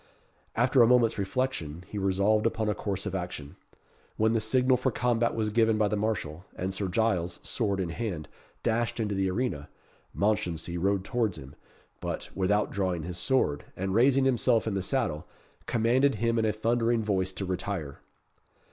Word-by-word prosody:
After 125 +2 +4
a 115 - +7
moment's 120 -3 +4
reflection, 95 - -2
he 105 - -5
resolved 100 +3 +2
upon 110 -1 -1
a 105 - +2
course 100 -1 -3
of 105 - -3
action. 90 -6 -5 0.6
When 110 +1 +3
the 115 - +2
signal 125 +4 +3
for 130 +1 0
the - - -8
combat 120 -1 +1
was 110 -2 0
given 110 0 +3
by 105 -1 +2
the 105 - 0
marshal, 100 -6 -2
and 95 +1 -3
Sir 95 0 -2
Giles, 90 -4 0
sword 100 -5 -1
in 90 -3 -1
hand, 85 -4 -4 0.4
dashed 115 +1 0
into 105 -2 -1
the 95 -1 +1
arena, 90 - -2 0.5
Mounchensey 90 -5 0
rode 95 +2 +1
towards 110 -1 -1
him, 65 +1 -10 0.5
but, - - -5
without 105 +2 +1
drawing 90 -4 -1
his 90 +1 -5
sword, 125 - +1
and 95 +1 -2
raising 130 +4 +4
himself 120 -3 +3
in 110 - -1
the 95 - -1
saddle, 95 - -1 0.4
commanded 120 +4 +3
him 115 +2 +1
in 110 - +2
a 110 - +2
thundering 115 +1 +1
voice 95 -3 0
to 95 +1 -4
retire. 90 -5 -4
105 Hz, 175 wpm, -28 LUFS, 95-115 Hz, 0.6 s, a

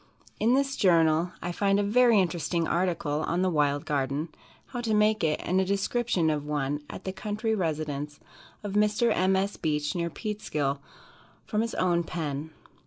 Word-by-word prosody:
In 235 +4 +3
this 275 0 +1
journal 165 -2 +3
I 175 - -2
find 195 +2 +2
a - - +2
very 230 +1 +4
interesting 170 -2 0
article 170 -4 0
on 175 +3 0
"The 185 - +2
Wild 145 -2 +1
Garden," 140 +2 -1 0.4
how 245 - -4
to 225 -2 0
make 210 -1 +3
it, 155 -1 +1
and 185 +2 +1
a - - +2
description 195 -2 0
of 150 -1 -2
one 145 -1 -2
at - - -8
the 190 - -3
country 215 +3 -2
residence 150 -6 -3 0.4
of 205 -2 -4
Mr. 210 +3 +2
M. 185 +1 +2
S. 195 +2 -1
Beach, 150 -2 -1
near 170 -2 -1
Peekskill, 155 -10 -3 0.7
from 215 - 0
his 230 0 -3
own 175 -2 +2
pen. 155 -3 -4
175 Hz, 175 wpm, -27 LUFS, 150-210 Hz, 0.7 s, very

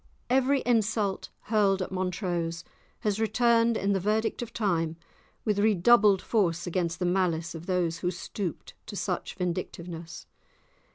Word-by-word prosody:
Every 265 +1 +3
insult 215 -4 +1
hurled 205 -3 +2
at - - -7
Montrose 180 -2 -2 0.4
has 210 -3 0
returned 230 +1 +3
in 200 +1 +1
the 195 - +1
verdict 215 +5 0
of 235 -1 -5
time 165 -7 0 0.5
with 210 -2 +1
redoubled 205 0 +5
force 175 -6 +1
against 175 -1 -1
the 180 - -1
malice 175 -2 0
of 165 +1 -9
those 175 -3 0
who 180 - 0
stooped 180 0 -5
to - - -7
such 185 -3 -3
vindictiveness. 170 -2 -5
190 Hz, 135 wpm, -28 LUFS, 175-215 Hz, 0.5 s, redoubled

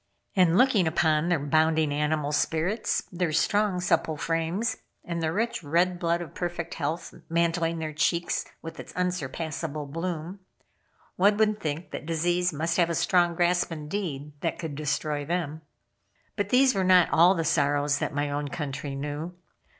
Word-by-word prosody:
And 180 -2 +4
looking 225 -8 +4
upon 160 0 +2
their 175 - +3
bounding 155 +1 +2
animal 150 0 0
spirits, 160 +8 0
their 175 -2 -1
strong 205 +3 +2
supple 160 -3 +1
frames, 165 +9 -1 0.3
and 170 -1 -3
the 160 -1 0
rich, 225 +3 -1
red 175 +4 +1
blood 170 0 0
of 155 - -12
perfect 175 -1 -4
health, 160 +2 -3 0.2
mantling 165 0 +1
their 155 -1 -4
cheeks 170 +3 0 0.2
with 165 - -8
its - - -9
unsurpassable 160 -3 -3
bloom, 165 +4 -4 0.8
one 205 +3 +4
would 215 -1 +2
think 155 0 -4
that 150 - -6
disease 175 +2 +1
must 160 +2 -1
have 170 -2 +2
strong 175 +1 +3
grasp 175 +1 +2
indeed 150 -2 -4
that 165 - -1
could 160 -3 -5
destroy 150 0 -2
them. 160 -1 -3 0.7
But 205 -2 -2
these 260 +2 +5
were 190 - 0
not 185 -1 +5
all 175 +4 +6
the 165 - 0
sorrows 145 -2 +2
that - - -2
my 145 0 -1
own 145 0 -2
country 140 -1 -4
knew. 150 +5 -5
165 Hz, 160 wpm, -27 LUFS, 150-180 Hz, 0.8 s, all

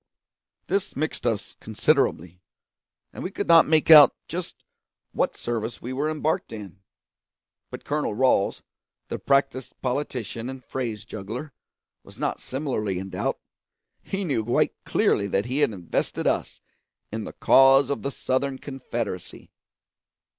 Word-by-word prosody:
This 200 +1 -1
mixed 155 -3 -2
us 110 -4 -2
considerably, 105 - 0 0.7
and - - -7
we - - -3
could 205 +1 -4
not 165 -1 +7
make 155 +1 +3
out 150 -3 +10
just 175 +2 -6 0.5
what - - -1
service 115 -1 -3
we 125 +2 -6
were 145 +4 -1
embarked 155 -3 -1
in; 100 -4 -9 0.9
but - - -9
Colonel 150 -7 -1
Ralls, 125 -5 +2 0.5
the - - -4
practised 135 -2 0
politician 125 -3 -3
and 130 -2 -9
phrase 115 -4 -4
juggler, 110 +7 -7 0.5
was - - -16
not - - -2
similarly 125 -8 -2
in 95 +1 -6
doubt; - - -2 0.6
he 195 0 -3
knew 135 -9 0
quite 120 +3 +1
clearly 100 - +2
that 100 +1 0
he 130 +4 -2
had 150 - +4
invested 90 -5 -2
us - - -1 0.5
in 110 +1 -4
the - - -8
cause 135 +1 +5
of 140 - -2
the 140 - -2
Southern 135 0 -1
Confederacy. 120 - -6
130 Hz, 140 wpm, -25 LUFS, 110-145 Hz, 0.9 s, out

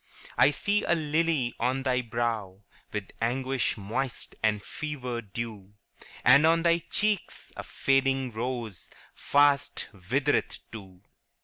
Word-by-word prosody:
' - - -16
I 130 - +7
see 205 +8 0
a - - +2
lily 155 -5 0
on 130 +3 0
thy 125 -2 +1
brow, 115 -5 -3 0.3
With 105 -2 -5
anguish 130 +1 0
moist 115 +6 -3
and 105 -2 +1
fever 130 -6 -4
dew; 105 -2 -7 0.5
And 140 +4 +8
on 165 0 +3
thy 170 0 +4
cheeks 210 -3 -1
a - - -5
fading 135 -1 +1
rose 115 -4 -4 0.2
Fast 145 0 +2
withereth 110 +9 0
too.' 95 -4 -11
125 Hz, 125 wpm, -28 LUFS, 110-145 Hz, 0.5 s, And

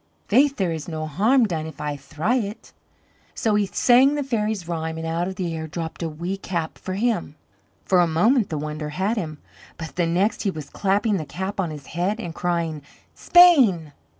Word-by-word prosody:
Faith 275 +6 +4
there 190 -7 0
is 160 -2 -5
no 155 -2 -4
harm 220 - +3
done 160 -6 -3
if 160 - -11
I 150 -1 -3
thry 155 - -1
it." 210 -2 -5 0.6
So 220 - 0
he 205 -1 +2
sang 260 +7 +4
the 290 - -1
fairies' 215 -7 -2
rhyme 160 -1 -3
and 160 - -5
out 165 +2 -1
of 190 - -5
the 175 -3 -3
air 160 0 -5
dropped 165 +2 -6
a 165 - -2
wee 170 +5 -4
cap 170 -4 -4
for 185 - -5
him. 210 -8 -1 0.5
For 185 - +3
a 175 - +4
moment 210 - +2
the 155 - -3
wonder 150 0 -4
had 190 +9 -1
him, 160 -8 -4 0.4
but 160 +1 -8
the 175 -2 +2
next 185 +6 +1
he 205 - 0
was 155 -6 -7
clapping 205 +1 +1
the 160 - -3
cap 190 +6 -5
on 180 -4 0
his 150 -3 -8
head 185 +6 -2
and 175 -7 -5
crying: 170 -3 -2 0.3
"Spain!" 250 - +5
175 Hz, 205 wpm, -23 LUFS, 160-210 Hz, 0.6 s, Spain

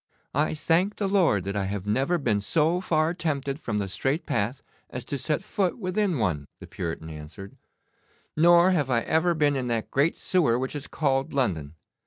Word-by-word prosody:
'I 150 +3 +1
thank 170 +6 +1
the 200 - -1
Lord 180 - +3
that 100 +2 -4
I 100 -1 0
have 100 0 -4
never 135 +11 +1
been 115 -9 0
so 160 - +2
far 160 -2 +1
tempted 140 -4 -2
from 110 -9 -3
the 100 -1 -1
straight 135 - -1
path 120 -3 -1 0.3
as 125 - -6
to 140 - -3
set 155 +5 -1
foot 190 -2 -1
within 190 -4 0
one,' 85 - -1
the - - -10
Puritan 80 -2 -5
answered, 80 +6 -10 0.8
'nor 175 +3 +6
have 150 -7 +1
I 120 -2 +2
ever 165 +5 +1
been 145 -2 +2
in 130 -2 -2
that 115 -2 -2
great 145 +5 +2
sewer 155 -11 +2
which 130 +3 -3
is 145 -1 -4
called 140 0 0
London. 85 - -1
140 Hz, 190 wpm, -26 LUFS, 105-165 Hz, 0.8 s, nor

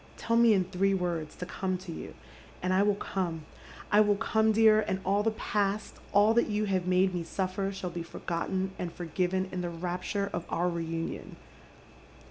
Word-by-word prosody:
Tell 230 - 0
me 230 -2 +6
in 190 - +3
three 195 +2 +1
words 170 -4 -2
to 180 - -5
come 185 0 -2
to 180 -1 -9
you, - - -7 0.5
and 185 0 +1
I 190 - +4
will 205 0 +3
come. 175 -6 -3 0.5
1 210 0 +6
will 205 - +4
come, 220 +1 +2
dear, 215 0 +6
and 190 -3 -2
all 200 +2 +2
the 225 - +2
past, 210 -1 -2
all 205 +2 +5
that 235 - +3
you 210 0 0
have 185 -3 0
made 185 +1 +3
me 175 - -1
suflEer, 190 +3 -2
shall 190 -2 -5
be 170 0 -4
forgotten 175 +3 -3
and 175 -1 -3
forgiven 180 +3 -1
in 180 - -3
the 175 - -2
rapture 180 +4 -3
of 175 - -2
our 175 +2 +1
reunion. 165 -1 -4
190 Hz, 190 wpm, -29 LUFS, 175-205 Hz, 0.5 s, me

